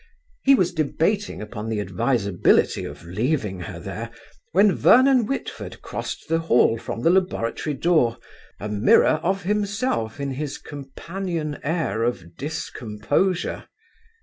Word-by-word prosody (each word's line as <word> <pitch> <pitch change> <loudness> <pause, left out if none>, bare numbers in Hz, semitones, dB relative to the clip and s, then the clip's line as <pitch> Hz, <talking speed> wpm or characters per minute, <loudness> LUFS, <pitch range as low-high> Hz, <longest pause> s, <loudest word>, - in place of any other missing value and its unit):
He 275 - +6
was 180 -6 +1
debating 165 - 0
upon 105 +1 -6
the 110 -2 -1
advisability 100 0 +1
of 75 +4 -9
leaving 105 - -1
her 85 - -7
there, - - -6 0.4
when 195 +3 +5
Vernon 255 -2 +5
Whitford 275 - -5
crossed - - -5
the 165 0 +1
hall 120 -7 +3
from 115 - -5
the 165 - +5
laboratory 160 -6 0
door, 135 -6 +2 0.4
a 105 - -4
mirror 105 +8 +4
of 195 +3 0
himself 205 - -1
in 140 -1 -2
his 145 +2 -4
companion 155 +3 -5
air 155 - -1
of 90 -8 -2
discomposure. 145 - -2
145 Hz, 125 wpm, -23 LUFS, 110-185 Hz, 0.4 s, He